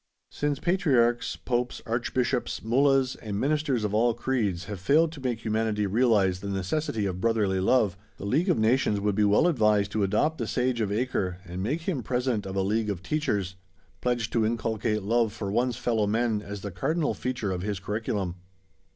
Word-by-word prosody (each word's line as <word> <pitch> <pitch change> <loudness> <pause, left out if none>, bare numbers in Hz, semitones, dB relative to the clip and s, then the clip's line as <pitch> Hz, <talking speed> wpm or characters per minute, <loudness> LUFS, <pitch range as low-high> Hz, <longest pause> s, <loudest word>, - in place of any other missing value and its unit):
Since 145 -1 -1
Patriarchs, 130 -10 +2
Popes, 125 0 -2
Archbishops, 120 +2 -1
Mullahs, 135 +2 +3
and 105 -2 -4
ministers 140 -4 0
of 105 -1 -1
all 115 +2 +3
creeds 115 -8 -1
have 100 -1 -6
failed 155 - +3
to 155 -4 -10
make 120 -3 -2
humanity 110 -1 0
realise 100 -4 +2
the 100 - -6
necessity 100 - -1
of 95 -1 -3
"brotherly 105 -4 +1
love," 100 -1 +3 0.2
the - - -7
League 155 - +1
of 175 - +3
Nations 110 -1 +2
would 105 0 0
be 105 +2 +2
well 105 +10 +4
advised 105 - +3
to 110 - -1
adopt 110 +11 +1
the 115 - -2
Sage 125 0 0
of 100 -2 -1
Acre 105 -5 -1
and 90 +1 -6
make 145 - -1
him 160 -6 -2
President 125 -2 -1
of 95 - -5
a 95 - +1
"League 105 +2 0
of 95 -3 -4
Teachers," 100 -11 -1 0.4
pledged 120 -3 -1
to 115 - +2
inculcate 110 -1 -1
love 115 +1 +1
for 100 -3 -4
one's 120 +2 0
fellowmen 110 -1 +1
as 100 -1 -7
the 100 - -5
cardinal 150 - 0
feature 125 -6 -3
of 90 -1 -3
his 100 0 -3
curriculum. 100 -2 -3
110 Hz, 185 wpm, -27 LUFS, 100-125 Hz, 0.4 s, well